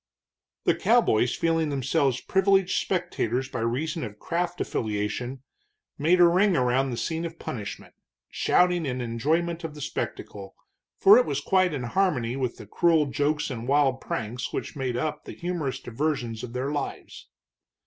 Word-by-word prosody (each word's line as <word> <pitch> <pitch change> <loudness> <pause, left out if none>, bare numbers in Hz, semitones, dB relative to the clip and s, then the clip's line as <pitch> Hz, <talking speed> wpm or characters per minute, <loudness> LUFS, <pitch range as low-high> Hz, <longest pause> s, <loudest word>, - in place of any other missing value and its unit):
The - - +4
cowboys, 120 +3 +3
feeling 165 -2 +1
themselves 135 -1 +1
privileged 190 -1 +2
spectators 135 - -1
by 125 - -4
reason 145 +8 -1
of 105 -3 -7
craft 175 +6 -2
affiliation, 110 +5 -3 0.6
made 170 +5 +3
a 175 - +8
ring 185 +1 +3
around 130 +1 +2
the 120 - -4
scene 160 +8 -2
of 165 -1 -5
punishment, 105 -9 -6 0.3
shouting 180 -3 +2
in 125 -1 -2
enjoyment 160 +9 -1
of 160 -2 -5
the - - -9
spectacle, 145 - -5 0.4
for 410 +5 +8
it - - +2
was - - -1
quite 185 -2 +2
in 140 -4 -3
harmony 125 -4 0
with 130 -3 -2
the - - -10
cruel 165 - +3
jokes 145 +1 0
and 120 -1 -5
wild 135 -2 +2
pranks 115 +3 -4
which - - -4
made 130 -3 -2
up 150 +4 -3
the - - -7
humorous 170 -6 -3
diversions 120 -3 -2
of 120 - -7
their 130 +3 -2
lives. 145 -2 -5
145 Hz, 160 wpm, -26 LUFS, 125-170 Hz, 0.6 s, a